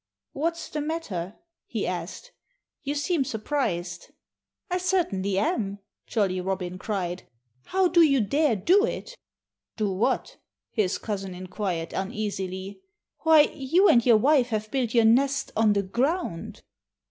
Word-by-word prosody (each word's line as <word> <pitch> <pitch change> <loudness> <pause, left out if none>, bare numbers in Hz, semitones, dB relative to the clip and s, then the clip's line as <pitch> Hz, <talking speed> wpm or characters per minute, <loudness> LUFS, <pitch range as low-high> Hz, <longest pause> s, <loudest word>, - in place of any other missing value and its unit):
"What's 335 +3 -2
the 300 - -3
matter?" 220 - -4 0.3
he 220 -3 -2
asked. 180 - -5 0.5
"You 285 +1 -3
seem 300 0 +1
surprised." 215 -7 -3 0.6
"I 360 - +1
certainly 200 - 0
am!" 200 -1 0 0.3
Jolly 190 -5 0
Robin 185 -1 -3
cried. 185 -4 -3 0.4
"How 380 -1 +2
do 345 -1 +4
you 280 -4 +5
dare 270 +4 +2
do 360 - +4
it?" - - -4 0.6
"Do 210 -3 0
what?" 215 +8 -1 0.3
his 205 -5 0
cousin 195 -4 -5
inquired 185 -2 -4
uneasily. 195 - -4 0.4
"Why, 320 -1 +6
you 325 +8 +3
and 235 - +5
your 235 -2 +6
wife 265 +2 +4
have 215 -2 -3
built 250 -4 -1
your 230 -1 +5
nest 270 +5 +3
on 215 -1 +4
the 200 -1 +1
ground!" 245 - -2
220 Hz, 135 wpm, -26 LUFS, 190-290 Hz, 0.6 s, Why